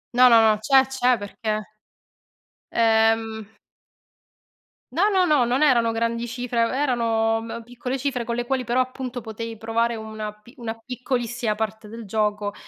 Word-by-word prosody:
No, 250 +1 +8
no, 230 - +7
no. 210 - -4
C'è, 265 +3 +5
c'è, 255 -2 +1
perché 215 0 -4 1.0
ehm 225 -1 +2 1.5
No, 400 +5 +4
no, 375 -2 +3
no, 300 -7 +4
non 250 +5 +1
erano 235 -5 +4
grandi 230 +1 -1
cifre, 235 -1 -1
e - - -2
erano, 230 -5 +1
m 230 0 -7
piccole 245 +2 -5
cifre, 255 -3 -2
con 235 +1 -2
le 245 0 -2
quali 260 0 -1
però, 245 +1 0
appunto, 255 -1 -3
potevi 225 0 -6
provare 230 +1 0
una 215 -1 -6
pi 210 +3 -19
una 230 -2 -5
piccolissima 240 -2 -3
parte 220 0 -4
del 225 +1 -9
gioco, 210 0 -1
230 Hz, 155 wpm, -23 LUFS, 220-250 Hz, 1.5 s, No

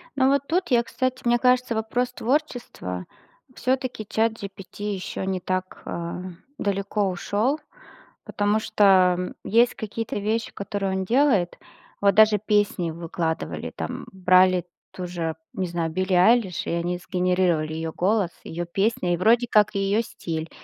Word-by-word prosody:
Ну, 265 -1 +3
вот 280 0 +2
тут 360 +3 0
я, 240 -1 +4
кстати, 255 +2 -2
мне 240 0 +4
кажется, 250 -1 +2
вопрос 230 +3 -1
творчества. 240 - -2 0.5
Всё-таки 255 -3 -1
ChatGPT 205 -2 -3
ещё 190 0 -5
не 190 -1 -1
так, 185 +1 -3
э, 170 0 -4 0.4
далеко 200 0 -1
ушёл, 210 - 0 0.7
потому 205 +1 +1
что 185 -4 +3
есть 235 +3 +3
какие-то 220 +1 -4
вещи, 220 +3 -1
которые 200 -1 -3
он 190 - -2
делает. 230 -6 +2 0.4
Вот 200 -2 +4
даже 215 -1 +6
песни 205 -4 +1
выкладывали, 165 0 -3
там, - - -5
брали 185 -1 +4 0.3
ту 180 -1 -6
же, 165 -2 -3 0.2
не 185 - -2
знаю, 170 -1 -2
Билли 185 +3 -1
Айлиш, 190 +1 +3
и - - -1
они 170 +1 -1
сгенерировали 180 -3 0
её 160 0 -3
голос, 195 -1 +1
её 175 +1 -4
песни, 195 +1 0
и - - 0
вроде 230 +6 +3
как 210 -3 +4
её 200 +2 +2
стиль, 165 -7 -5
195 Hz, 140 wpm, -24 LUFS, 180-225 Hz, 0.7 s, даже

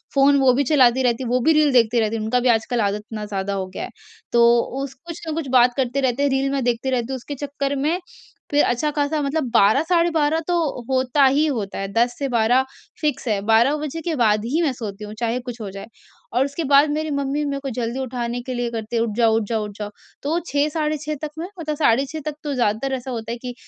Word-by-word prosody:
Phone 280 +1 +5
वो 265 -2 +5
भी 275 +3 +2
चलाती 260 -3 +4
रहती 245 +1 +1
हैं, 235 - -4
वो 250 +1 +2
भी 320 +6 +4
रील 305 -1 +4
देखती 235 -1 +4
रहती 220 0 0
हैं, 215 - -4
उनका 250 +3 +1
भी 245 0 +1
आजकल 230 +1 +1
आदत 200 0 +1
इतना 215 -1 -4
ज़्यादा 200 -1 -3
हो 190 -1 -3
गया - - -4
है। - - -6 0.4
तो 235 0 +5 0.4
उस 275 -1 -6
कुछ 335 +5 -10
न - - -2
कुछ 320 -3 -3
बात 245 -1 +5
करते 265 +1 0
रहते 260 +1 +1
हैं, 285 - +3
रील 270 0 0
मैं 275 -1 -1
देखती 240 +2 0
रहती 240 -3 0
हूँ। 260 - -2
उसके 285 +4 -7
चक्कर 280 0 -2
में 305 +6 0 0.5
फिर 290 0 +4
अच्छा-ख़ासा 295 +4 0
मतलब 290 +2 -1
12, 225 +6 +5
साढ़े 340 0 +2
12 315 0 +2
तो 355 - +1 0.3
होता 260 +1 +2
ही 280 +4 +3
होता 220 -9 -3
है। 195 - -3
10 240 +1 +2
से 280 - -1
12 240 +2 +3 0.4
फ़िक्स 295 -4 -1
है। 210 -3 +1
12 230 +6 +4
बजे 305 +2 -5
के 325 0 -2
बाद 215 -4 +2
ही 300 +8 0
मैं 280 -5 +1
सोती 210 -4 -7
हूँ, 210 - -8
चाहे 235 +1 0
कुछ 245 -2 -8
हो 205 - -5
जाए। 195 +2 -8 0.5
और 250 +3 +3
उसके 280 +4 -4
बाद 285 +2 +5
मेरी 310 0 -2
मम्मी 280 +1 -1
मेरे 280 -1 -2
को 275 - -4
जल्दी 240 +1 -3
उठाने 245 -1 -3
के 255 - -5
लिए 240 0 -1
करती 225 0 -5
हैं, 230 - +2
"उठ 220 -3 -3
जाओ, 225 -2 +4
उठ 225 - 0
जाओ, 220 -2 0
उठ 210 - -7
जाओ", 210 -1 -4 0.3
तो 315 +4 0
6, 285 +1 +1
साढ़े 305 0 -1
6 305 - -2
तक 300 - -3
मैं 340 - -4
मतलब 305 -2 -3
साढ़े 275 -2 +3
6 310 +3 -7
तक 305 -1 -3
तो 290 - -2
ज़्यादातर 240 +3 0
ऐसा 255 +1 -7
होता 230 -1 -4
है 240 - -5
कि 250 - -4
260 Hz, 255 wpm, -22 LUFS, 230-290 Hz, 0.5 s, Phone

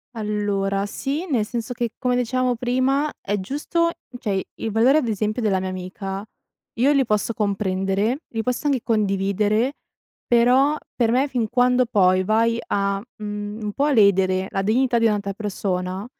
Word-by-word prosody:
Allora, 205 -2 -1
sì, 280 - -3
nel 235 -7 +1
senso 235 +1 -4
che, 235 -1 -2
come 250 -1 0
dicevamo 250 +1 0
prima, 260 +5 +1
è 205 +1 -2
giusto 305 - -1 0.3
cioè 215 -5 -2
i 190 - -1 0.2
i - - 0
valori 230 +7 +4
ad 290 -6 +1
esempio 215 +2 -1
della 195 -4 +1
mia 190 - -3
amica 190 +2 -5 0.5
io 270 +4 +4
li 275 -2 +3
posso 215 +1 0
comprendere, 200 +3 0
li 225 -1 -3
posso 250 +4 -2
anche 270 -4 +1
condividere, 210 +3 +1 0.5
però 250 +5 +4 0.2
per 230 -2 +2
me 260 +4 +2
fin 245 -4 -1
quando 250 +1 +3
poi 185 -5 +3
vai 230 +3 +2
a, 200 0 0 0.2
mhmm, 210 0 -5
un 210 - -2
po' 280 - +1
a 295 - +2
ledere 190 -4 +3
la 195 - -1
dignità 240 +3 +2
di 230 - +2
un'altra 205 -2 0
persona, 190 -2 -3
215 Hz, 165 wpm, -22 LUFS, 200-250 Hz, 0.5 s, valori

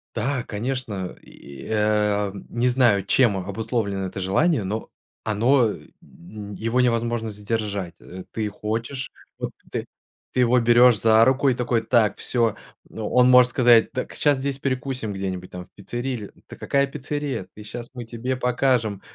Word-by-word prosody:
Да, 125 +3 -1
конечно! 105 -4 -4
И, 70 -2 -12
э, 105 -2 +1 0.2
не 120 +1 +1
знаю, 120 -6 +3
чем 115 -2 +3
обусловлено 100 +1 -2
это 95 +1 -6
желание, 110 - +2
но 105 +3 -4 0.4
оно 115 +3 +3
э - - -6 0.2
ну 100 +4 -11
его 115 +5 0
невозможно 115 -2 0
сдержать. 105 -4 -3
Э, 90 0 -10
ты 110 -2 -2
хочешь, 115 +6 -4 0.3
вот - - -4 0.2
ты, - - -4 0.5
ты 130 - +2
его 125 0 +4
берёшь 120 0 +6
за 110 0 +6
руку 130 +2 +3
и 130 - +3
такой: 120 -1 0
"Так, 115 -2 +2
всё". 115 -4 0 0.3
Ну, 110 -1 -5
он 125 0 +4
может 125 -1 +7
сказать: 120 -2 +5
"Так, 125 - -4
щас 145 -1 +3
здесь 135 0 -3
перекусим 130 -5 -3
где-нибудь, 95 -2 -4
там, 90 0 -7
в - - -27
пиццерии 120 +6 -4
или". 110 -5 -6 0.2
"Да - - -10
какая 140 0 +1
пиццерия? 145 -5 -4
Ты 105 - -11
щас, 120 +3 -8
мы 120 - -6
тебе 120 +3 -3
покажем 125 -4 +1
115 Hz, 165 wpm, -23 LUFS, 105-125 Hz, 0.5 s, может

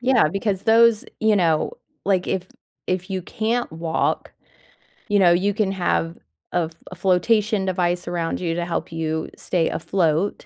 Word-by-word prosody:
Yeah, 250 -9 +4
because 195 +2 -2
those, 225 -1 +5 0.2
you 220 -1 +4
know, 165 -4 +2 0.3
like, 185 -2 +1
if 185 -1 -2 0.4
if 185 0 -2
you 185 -2 -2
can't 230 +5 -1
walk, 160 0 -1 0.8
you 205 -2 +3
know, 175 -2 +6
you 195 +4 +2
can 200 -1 0
have 175 -2 -1 0.3
a 170 -2 0 0.2
a 185 - -7
flotation 200 +3 +2
device 175 -2 0
around 170 -2 -2
you 165 -2 -1
to 175 0 -2
help 170 -1 -3
you 160 -1 -2
stay 170 -3 0
afloat 170 +1 0
185 Hz, 155 wpm, -22 LUFS, 170-205 Hz, 0.8 s, know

